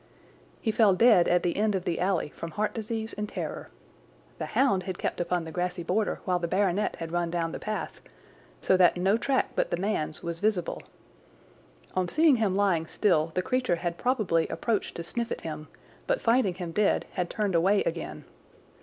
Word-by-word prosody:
He 220 - +2
fell 210 -3 +4
dead 220 -4 +6
at 180 0 +3
the 175 - 0
end 210 0 +1
of 185 - -3
the 170 - -1
alley 180 -4 0
from 165 - -7
heart 210 +6 -2
disease 220 0 -4
and 210 0 -4
terror. - - -5 0.7
The - - -3
hound 260 -9 +3
had 185 0 -5
kept - - -2
upon 175 0 -1
the 160 - -7
grassy 180 +1 -2
border 200 +5 -1
while 180 -2 +1
the 170 - -2
baronet 195 +2 +1
had 165 -1 -6
run 175 -1 0
down 165 -1 -1
the - - -6
path, 215 0 -4 0.6
so 190 - +4
that 180 -1 +5
no 190 +4 +3
track 260 +3 0
but - - 0
the - - -1
man's 180 -5 -2
was 170 -1 -4
visible. 205 -4 0 1.1
On 185 -1 0
seeing 310 - +4
him 210 -4 +1
lying 185 -5 +2
still 165 -6 +2
the 185 - +1
creature 255 -6 +1
had 170 0 -4
probably 215 -10 +1
approached 225 -4 -2
to 170 - -4
sniff 235 +7 -3
at - - -3
him, 155 -1 -6 0.4
but - - +1
finding 230 -6 +2
him 175 -2 -5
dead 210 +4 +2
had 180 -2 -2
turned 210 -3 -1
away 190 +5 +3
again. - - -4
185 Hz, 195 wpm, -28 LUFS, 175-215 Hz, 1.1 s, dead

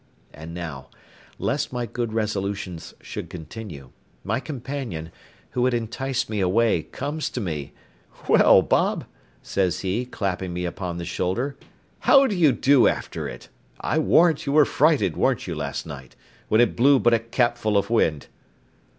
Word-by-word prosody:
And 80 +2 -9
now, 80 -7 -7 0.5
lest 145 +1 -1
my 125 -1 -2
good 120 0 -3
resolutions 100 -5 -3
should - - -6
continue, 80 - -9 0.3
my 115 +5 -1
companion, 130 - -5 0.4
who 125 0 +1
had 130 -1 +2
enticed 120 +3 -2
me 105 -1 -3
away, 95 0 +2
comes 145 - -4
to - - -4
me; 80 -9 -4 0.5
"Well, - - +6
Bob," - - +1 0.4
says 95 -3 0
he, 100 +6 -2
clapping 95 -6 -3
me 90 0 -3
upon 85 0 -4
the 85 - -5
shoulder, 120 +14 -2 0.4
"how 275 0 +6
do 215 - 0
you 165 -6 +5
do 130 +1 +4
after - - -2
it? - - -11 0.3
I 160 - 0
warrant 160 -1 +3
you 140 - 0
were 150 -1 +6
frighted, 155 +2 +2
wer'n't 130 -3 +1
you, 90 - -4
last 70 -3 -4
night, 65 -3 -10 0.3
when 110 +2 +4
it 120 - +2
blew 135 +4 +5
but 120 -2 +3
a 115 - +4
capful 115 -2 0
of 100 - 0
wind?" 80 -10 +2
110 Hz, 160 wpm, -24 LUFS, 90-130 Hz, 0.5 s, Well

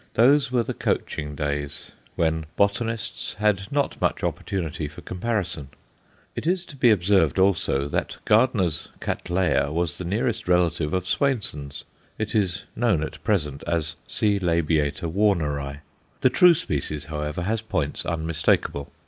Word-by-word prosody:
Those 135 +3 +5
were 125 -2 +2
the - - -3
coaching 75 -1 -2
days, 70 -1 -3 0.2
when 80 -1 0
botanists 110 +3 -1
had 105 -2 0
not 140 0 -1
much - - 0
opportunity 80 -5 -2
for 75 - -11
comparison. 90 - -3 0.7
It - - -4
is 180 +1 +1
to 150 - -12
be 125 -3 +4
observed, 95 - +3
also, 90 -7 +2
that 70 - -2
Gardner's 105 -8 +2
Cattleya 85 -5 0
was 85 0 -1
the - - -3
nearest 105 +4 -1
relative 85 -2 +2
of 90 -1 -1
Swainson's; 90 - -1 0.3
it 110 -1 -3
is 100 -2 0
known 110 -10 +2
at - - -7
present 75 -10 0
as 80 -1 0
C. 105 -2 +1
labiata 85 -3 +1
Warneri. 75 -7 0 0.4
The 130 - +4
true 180 +4 +7
species, 75 - -3
however, 75 +2 -3
has 110 +4 0
points 85 -10 -2
unmistakable. 80 -3 0
90 Hz, 140 wpm, -24 LUFS, 75-105 Hz, 0.7 s, true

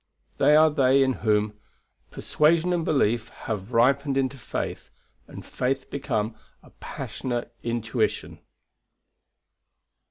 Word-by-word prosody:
They 150 - +5
are 155 0 +6
they 135 -2 +4
in 130 0 +1
whom 105 -1 +1 0.5
"Persuasion 165 +3 +1
and 170 -2 0
belief 120 -7 +1 0.2
Have 105 0 -4
ripened 135 +4 +2
into 135 0 0
faith; 130 - -5 0.4
and - - -10
faith 130 +1 -3
become 115 -6 -2 0.3
A - - -18
passionate 120 -2 -5
intuition." 115 -1 -2
130 Hz, 105 wpm, -25 LUFS, 115-140 Hz, 0.5 s, are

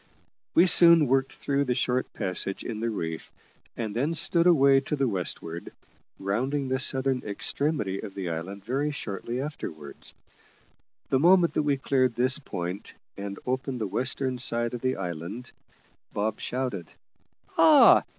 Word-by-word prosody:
We 170 - +7
soon 170 -3 +7
worked 135 0 +1
through 140 0 -1
the 125 -2 0
short 125 +1 -1
passage 95 +1 -2
in 110 -3 -5
the 115 +1 -1
reef, 80 -7 -5 0.5
and 110 -3 -4
then 145 +7 0
stood 170 +2 +3
away 140 -5 +5
to 135 +2 -3
the 135 -2 0
westward, 85 -4 -4 0.5
rounding 130 +8 -2
the 130 0 0
southern 130 -1 +1
extremity 105 -1 -2
of 100 -3 -9
the 95 -2 -4
island 95 +5 -6
very 135 +5 -1
shortly 120 -3 -5
afterwards. 80 - -7 0.9
The 130 - +2
moment 175 +2 +5
that - - +1
we 145 -2 +1
cleared 130 -3 +1
this 130 +4 +3
point, 90 -7 -6 0.2
and 100 0 -6
opened 130 0 -2
the 110 - -1
western 125 +5 -2
side 120 -1 +1
of 120 - -5
the 130 0 0
island, 90 +6 -6 0.6
Bob 105 +1 -2
shouted, 125 -10 -3 0.7
"Ah! - - +7
125 Hz, 150 wpm, -26 LUFS, 100-135 Hz, 0.9 s, We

